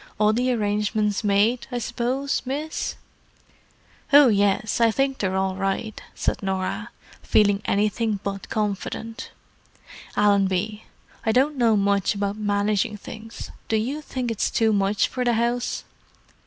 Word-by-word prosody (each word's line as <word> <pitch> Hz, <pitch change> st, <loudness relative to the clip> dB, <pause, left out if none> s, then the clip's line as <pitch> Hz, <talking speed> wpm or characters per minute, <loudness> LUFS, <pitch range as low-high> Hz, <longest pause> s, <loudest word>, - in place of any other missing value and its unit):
"All 215 Hz, 0 st, +4 dB
the 250 Hz, +3 st, +1 dB
arrangements 210 Hz, -1 st, 0 dB
made, 210 Hz, +4 st, +2 dB
I 245 Hz, -, -2 dB
suppose, 245 Hz, +4 st, -1 dB
miss?" 290 Hz, +5 st, -3 dB, 1.2 s
"Oh, 285 Hz, -2 st, +8 dB
yes, 205 Hz, +2 st, +1 dB
I 230 Hz, -, +6 dB
think 270 Hz, +3 st, 0 dB
they're 190 Hz, -2 st, -1 dB
all 190 Hz, 0 st, 0 dB
right," 195 Hz, +3 st, -2 dB
said -, -, -1 dB
Norah, 190 Hz, -1 st, -2 dB, 0.3 s
feeling 205 Hz, -1 st, +3 dB
anything 210 Hz, +1 st, 0 dB
but 195 Hz, -1 st, -5 dB
confident. 215 Hz, +1 st, -3 dB, 0.9 s
"Allenby—I 205 Hz, +2 st, 0 dB
don't 270 Hz, +6 st, +2 dB
know 230 Hz, -4 st, +3 dB
much 200 Hz, 0 st, +1 dB
about 200 Hz, 0 st, -2 dB
managing 205 Hz, 0 st, 0 dB
things; 220 Hz, +2 st, -9 dB, 0.2 s
do 225 Hz, -, 0 dB
you 265 Hz, +8 st, -2 dB
think 255 Hz, -5 st, -3 dB
it's 225 Hz, -, 0 dB
too 220 Hz, -1 st, +2 dB
much 200 Hz, 0 st, +2 dB
for 255 Hz, -, -3 dB
the 240 Hz, -1 st, +2 dB
house?" 235 Hz, +2 st, -1 dB
215 Hz, 130 wpm, -24 LUFS, 200-240 Hz, 1.2 s, Oh